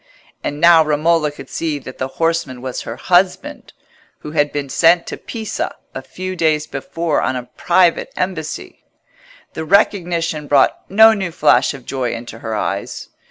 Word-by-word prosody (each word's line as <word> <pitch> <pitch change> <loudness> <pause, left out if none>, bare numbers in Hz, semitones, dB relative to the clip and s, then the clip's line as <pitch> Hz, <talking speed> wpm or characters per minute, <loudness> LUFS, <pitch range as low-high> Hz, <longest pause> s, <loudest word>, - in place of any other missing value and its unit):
And 145 - -3
now 170 0 +7
Romola 155 +1 +1
could 145 - -11
see 160 -3 -3
that 130 -2 -10
the 130 - -1
horseman 165 -6 -1
was 130 -1 -4
her 115 - -6
husband, 185 - 0 0.5
who 150 - -7
had 145 -2 +1
been 145 -1 -3
sent 170 +5 +3
to - - -5
Pisa 220 -2 -5 0.2
a - - -5
few 185 0 -6
days 155 -3 +1
before 160 +3 -2
on 130 - -1
a 125 - -4
private 175 -1 +2
embassy. 175 -4 -4 0.7
The 160 - -4
recognition 170 -4 +1
brought 140 -2 +2
no 220 +3 +7
new 195 -4 -2
flash 160 - +3
of 130 -3 -13
joy 130 -3 -2
into 115 -1 -9
her 110 -1 -4
eyes. 100 -1 -4
160 Hz, 160 wpm, -18 LUFS, 140-175 Hz, 0.7 s, now